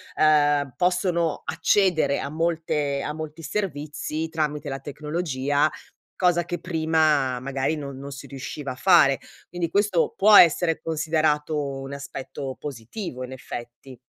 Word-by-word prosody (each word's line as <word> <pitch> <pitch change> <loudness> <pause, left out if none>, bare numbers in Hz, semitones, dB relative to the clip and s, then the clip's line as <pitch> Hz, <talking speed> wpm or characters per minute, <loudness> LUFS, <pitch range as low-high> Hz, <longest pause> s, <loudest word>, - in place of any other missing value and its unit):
uhm, 145 -3 +3
possono 180 -3 +1
accedere 180 -8 +2
a 140 - -4
molte 155 -3 -1
a 150 - -3
molti 155 +1 -7
servizi 155 -2 -3
tramite 150 -2 -2
la 135 0 -4
tecnologia, 150 -1 -1 0.5
cosa 175 -2 +2
che 175 0 -4
prima, 155 -6 +1
magari, 135 +3 -1
non 140 -3 -6
non 140 +1 -8
si 140 - -9
riusciva 140 +1 -6
a - - -12
fare. 140 -2 +5 0.3
Quindi 175 -2 -3
questo 200 -4 +2
può 210 +2 +6
essere 170 -2 +6
considerato 155 -1 0 0.2
un 135 +1 -7
aspetto 135 -1 -6
positivo, 130 - -6
in 125 - -7
effetti. 125 0 -9
150 Hz, 130 wpm, -24 LUFS, 140-165 Hz, 0.5 s, può